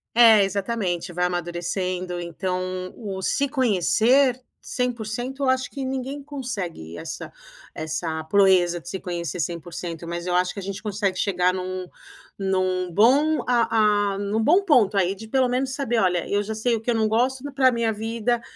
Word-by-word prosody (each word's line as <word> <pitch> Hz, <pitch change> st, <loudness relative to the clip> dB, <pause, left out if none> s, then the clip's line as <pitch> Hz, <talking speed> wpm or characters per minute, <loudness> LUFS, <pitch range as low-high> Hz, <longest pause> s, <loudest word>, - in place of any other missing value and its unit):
É, 225 Hz, -4 st, +8 dB
exatamente, 195 Hz, -3 st, -2 dB
vai 180 Hz, +1 st, +1 dB
amadurecendo. 175 Hz, +1 st, -2 dB
Então 180 Hz, +2 st, -3 dB, 0.3 s
o 195 Hz, -4 st, -6 dB
se 280 Hz, +9 st, +1 dB
conhecer 255 Hz, -, +3 dB, 0.2 s
100% 245 Hz, +2 st, -3 dB
eu 260 Hz, -, +2 dB
acho 260 Hz, -1 st, +1 dB
que 275 Hz, -2 st, -4 dB
ninguém 265 Hz, +2 st, -4 dB
consegue 205 Hz, -, -6 dB
essa -, -, -7 dB, 0.4 s
essa 160 Hz, +1 st, -3 dB
proeza 180 Hz, -2 st, +4 dB
de 175 Hz, -, -10 dB
se 190 Hz, -, -4 dB
conhecer 175 Hz, -2 st, -4 dB
100%, 170 Hz, 0 st, -5 dB
mas 170 Hz, +1 st, -4 dB
eu 180 Hz, -, 0 dB
acho 180 Hz, 0 st, +1 dB
que 200 Hz, -, -6 dB
a -, -, -6 dB
gente 195 Hz, +2 st, -6 dB
consegue 200 Hz, -3 st, -1 dB
chegar 185 Hz, -2 st, +1 dB
em -, -, -2 dB
um 185 Hz, 0 st, -4 dB, 0.5 s
em 190 Hz, -1 st, 0 dB
um 185 Hz, -1 st, 0 dB
bom 275 Hz, -, +4 dB
a 215 Hz, -4 st, +3 dB
a -, -, -5 dB
em 205 Hz, 0 st, -3 dB
um 220 Hz, 0 st, +1 dB
bom 360 Hz, -, +4 dB
ponto 225 Hz, -, +4 dB
aí 190 Hz, +1 st, +2 dB
de 220 Hz, +3 st, -10 dB
pelo 260 Hz, +2 st, +2 dB
menos 260 Hz, +1 st, -1 dB
saber: 240 Hz, -5 st, 0 dB
"Olha, 180 Hz, -3 st, +1 dB
eu 205 Hz, 0 st, +1 dB
já 220 Hz, +2 st, -4 dB
sei 230 Hz, +2 st, +1 dB
o 220 Hz, -, -4 dB
que 235 Hz, -, -5 dB
eu -, -, +1 dB
não 220 Hz, -1 st, +2 dB
gosto 250 Hz, +4 st, +1 dB
para 260 Hz, -2 st, +4 dB
minha 230 Hz, -2 st, 0 dB
vida, 230 Hz, +2 st, -1 dB
205 Hz, 185 wpm, -24 LUFS, 180-245 Hz, 0.5 s, É